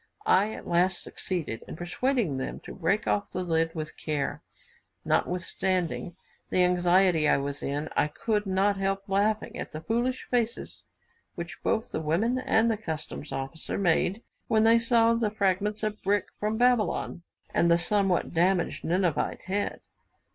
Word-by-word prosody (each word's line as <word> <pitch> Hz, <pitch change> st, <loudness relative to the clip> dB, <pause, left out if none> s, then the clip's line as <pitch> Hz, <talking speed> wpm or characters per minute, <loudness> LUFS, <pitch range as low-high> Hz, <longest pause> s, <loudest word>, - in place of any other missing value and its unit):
I 220 Hz, -, +4 dB
at -, -, -9 dB
last 175 Hz, +2 st, +2 dB
succeeded 160 Hz, -11 st, -4 dB
in -, -, -7 dB
persuading 175 Hz, -, 0 dB
them 130 Hz, -, -4 dB
to -, -, -9 dB
break 190 Hz, +4 st, 0 dB
off 205 Hz, -, 0 dB
the 185 Hz, -, -3 dB
lid 165 Hz, -1 st, 0 dB
with 155 Hz, -1 st, -5 dB
care. 145 Hz, -3 st, -2 dB, 0.6 s
Notwithstanding 180 Hz, 0 st, -1 dB, 0.3 s
the 185 Hz, -, +3 dB
anxiety 180 Hz, -2 st, +4 dB
I -, -, +4 dB
was 140 Hz, +1 st, -3 dB
in, 145 Hz, +2 st, -2 dB
I -, -, +3 dB
could 210 Hz, +5 st, -1 dB
not 195 Hz, +1 st, +2 dB
help 195 Hz, 0 st, -1 dB
laughing 205 Hz, +2 st, 0 dB
at -, -, -6 dB
the 155 Hz, -, -5 dB
foolish 240 Hz, +6 st, -1 dB
faces 235 Hz, -1 st, -1 dB, 0.5 s
which 170 Hz, 0 st, -7 dB
both 220 Hz, 0 st, 0 dB
the -, -, -2 dB
women 205 Hz, +12 st, +1 dB
and 230 Hz, -2 st, +3 dB
the 220 Hz, -, -1 dB
customs' 160 Hz, -6 st, -6 dB
officer 135 Hz, +4 st, -4 dB
made 195 Hz, +3 st, +1 dB, 0.2 s
when 220 Hz, -1 st, +3 dB
they 230 Hz, +1 st, +6 dB
saw 230 Hz, 0 st, +4 dB
the 230 Hz, -2 st, +1 dB
fragments 210 Hz, +1 st, 0 dB
of 215 Hz, 0 st, -2 dB
brick 205 Hz, +1 st, +1 dB
from 215 Hz, +1 st, -1 dB
Babylon, 245 Hz, -7 st, +1 dB, 0.3 s
and 170 Hz, -, +3 dB
the 170 Hz, -, +5 dB
somewhat 190 Hz, 0 st, +1 dB
damaged 175 Hz, +1 st, +1 dB
Ninevite 175 Hz, -2 st, 0 dB
head. 200 Hz, +2 st, -2 dB
190 Hz, 155 wpm, -28 LUFS, 170-215 Hz, 0.6 s, they